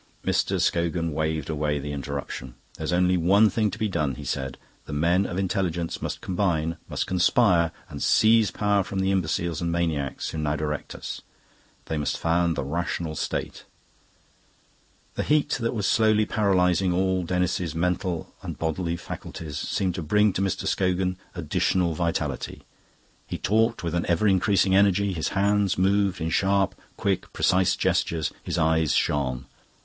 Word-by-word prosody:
Mr. - - +1
Scogan 85 -1 0
waved 80 -1 -1
away 75 -1 -1
the 75 +1 -5
interruption. 70 -3 -5 0.2
"There's - - -3
only 90 +1 +3
one 100 +5 +4
thing 110 -2 +1
to 105 - -7
be 110 -1 0
done," 75 -9 -1
he - - -8
said. 65 -1 -3 0.3
"The 75 - -7
men 85 +6 +2
of 90 - -5
intelligence 90 -3 -1
must - - -4
combine, 85 -4 0
must - - -1
conspire, 90 -2 +3 0.2
and - - -8
seize 110 -1 +4
power 100 +2 +1
from 95 - -6
the 95 0 +1
imbeciles 85 -3 -1
and 85 0 -1
maniacs 80 -6 -1
who 80 - -4
now 75 -1 0
direct 75 0 -4
us. - - -6 0.6
They 80 - -2
must 75 - -1
found 85 0 +1
the - - -2
Rational 85 +2 -2
State." - - -4 1.5
The - - -2
heat 150 -1 +2
that 115 +1 -1
was 105 -3 -1
slowly 110 -1 +3
paralysing 95 -4 +2
all 95 +1 +1
Denis's 90 -2 -1
mental 90 0 -1
and - - -6
bodily 85 +1 -2
faculties, 75 -3 -7
seemed 95 -2 -1
to 90 - -4
bring 105 +5 +3
to 95 - -1
Mr. 95 -2 -1
Scogan 90 -1 0 0.2
additional 90 -3 0
vitality. 75 -4 -2 0.6
He - - -4
talked 115 +2 +1
with 85 -1 -2
an 85 -1 -1
ever 85 +5 +2
increasing 95 0 +3
energy, 100 0 +3
his 80 -3 -2
hands 100 0 +2
moved 95 0 +2
in 80 0 -2
sharp, 95 +2 +2 0.2
quick, 100 -2 -1
precise 90 0 +3
gestures, 80 -3 0
his - - -3
eyes 80 -1 +2
shone. 65 -3 0
90 Hz, 160 wpm, -25 LUFS, 80-95 Hz, 1.5 s, one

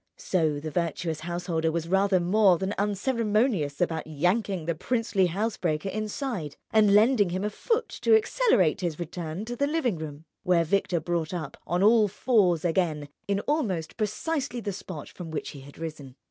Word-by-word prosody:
So 155 -5 0
the 155 +1 -5
virtuous 165 -1 -2
householder 170 -1 -1
was 165 0 -2
rather 195 +1 +3
more 185 +1 +4
than 190 +3 -2
unceremonious 210 - 0
about 160 -3 -1
yanking 180 +3 0
the 170 - 0
princely 205 +1 0
housebreaker 185 -3 -1
inside 215 - -4
and 210 -2 +5
lending 215 -2 +5
him 185 +2 -2
a 210 - -1
foot 460 - -1
to 445 - +5
accelerate 425 - +2
his 170 -4 -2
return 170 +2 -5
to 240 +2 -5
the 280 +3 +1
living 285 - 0
room; 155 0 -7 0.2
where 180 -3 +3
Victor 175 0 +1
brought 170 +1 -2
up, 155 -5 -5
on 175 +4 +1
all 215 0 +6
fours 190 -6 +2
again, 160 -4 0 0.2
in 200 0 0
almost 205 - -1
precisely 250 +4 -2
the 205 -3 -3
spot 180 -5 -7
from 175 -3 -9
which 160 - -4
he 140 - -9
had 140 +1 -13
risen. 150 -5 -7
185 Hz, 170 wpm, -27 LUFS, 160-215 Hz, 0.2 s, all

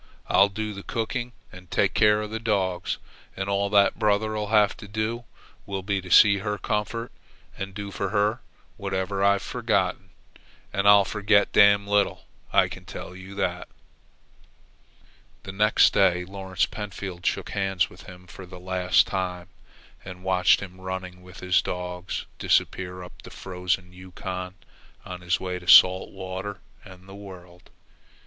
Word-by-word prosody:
I'll 100 +1 +4
do 105 +1 -4
the 100 - -8
cooking 120 +3 -3 0.2
and 90 -1 -14
take - - +1
care 105 0 +4
of 105 - -7
the 110 - -3
dogs, 95 -6 -1 0.4
and 95 0 -3
all 100 0 0
that 100 -1 +3
brother'll 105 0 0
have 105 -1 +3
to 105 - -10
do 110 +3 -3 0.4
will 95 -1 -4
be 100 0 -1
to 90 - -11
see 100 +2 +7
to 100 - -7
her 105 -1 -2
comfort 105 +3 -3 0.4
and 95 0 -6
do 100 -1 -6
for 100 0 -3
her 105 +3 +1 0.4
whatever 95 -1 -2
I've 100 0 +3
forgotten. 95 - -1 0.6
And 100 0 +1
I'll 100 -1 +7
forget 105 0 +2
damn 100 0 +5
little, 100 -1 0 0.3
I - - +4
can - - -10
tell 90 - -9
you." 95 +1 -10
The 90 -3 -2 1.8
next 105 +2 +4
day 90 -2 +3
Lawrence 95 0 -2
Pentfield 100 -4 -7
shook - - -1
hands 95 -2 0
with - - -14
him 90 -1 -12
for 95 0 -11
the 90 0 -11
last 90 0 +2
time 90 -1 -4 0.5
and 90 -1 -10
watched 90 -1 +3
him, 95 -1 -10
running 95 -1 -6
with 90 +1 -13
his 90 -1 +3
dogs, 90 0 -5
disappear 90 -1 0
up 90 - -13
the - - -12
frozen 90 0 -3
Yukon 90 0 -7 0.5
on 90 -1 -7
his 85 -1 0
way 90 -1 -4
to 90 - -15
salt 90 +1 +7
water 95 +1 -6 0.2
and 95 0 -14
the 95 - -11
world. 90 -3 -12
95 Hz, 155 wpm, -25 LUFS, 90-100 Hz, 1.8 s, see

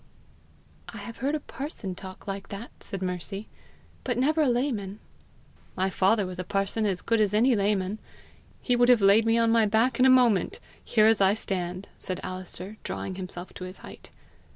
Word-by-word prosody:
"I - - -9
have 235 - -8
heard 280 +4 0
a - - -1
parson 270 - -6
talk 185 +1 -10
like 195 0 -5
that," 205 +4 -7
said 195 -1 -6
Mercy, 185 +3 -4 0.6
"but 245 -3 -1
never 305 +5 +2
a 290 - +3
layman!" 235 -6 -1 0.8
"My 190 +1 +1
father 200 +3 +2
was 180 0 -7
a - - -2
parson 195 +3 -1
as 190 -3 -2
good 230 -1 +1
as 210 -1 +2
any 240 +3 +4
layman. 200 0 0 0.6
He 245 - +2
would 245 0 +4
have 245 -3 +6
laid 205 +3 +5
me 225 +1 +4
on 230 -1 +3
my 225 -2 +4
back 225 +5 +2
in 255 - +6
a - - +6
moment 245 -8 +4 0.2
here 215 -3 +3
as 220 -2 +4
I 195 +1 +5
stand!" 185 -2 -3
said 185 - -4
Alister, 185 +2 -6
drawing 190 - -4
himself 185 -1 -7
to - - -8
his 185 +1 -9
height. - - -12
205 Hz, 190 wpm, -27 LUFS, 190-235 Hz, 0.8 s, have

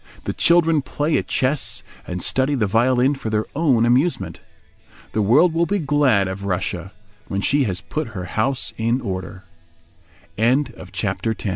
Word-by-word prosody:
The - - -3
children 165 -3 +3
play 150 +3 -1
at - - -6
chess 135 +2 -1 0.2
and 90 0 -4
study 135 +2 +1
the 115 -5 +1
violin 125 +6 +3
for 135 -5 -5
their 110 0 0
own 135 -7 +3
amusement. 130 +9 +1 0.7
The 110 - 0
world 140 - +4
will 170 +1 +1
be 205 - +1
glad 140 - +2
of 95 +1 -5
Russia—when 100 +2 -4
she 140 +5 +2
has 95 -4 -3
put 155 -1 -4
her 90 - -4
house 125 +7 -1
in 115 +3 +1
order. 95 -4 -5 1.0
HOW 120 +3 +4
TO - - -12
BE - - -19 0.3
HAPPY 95 +4 -1
THOUGH 105 - -4
120 Hz, 165 wpm, -21 LUFS, 100-145 Hz, 1.0 s, world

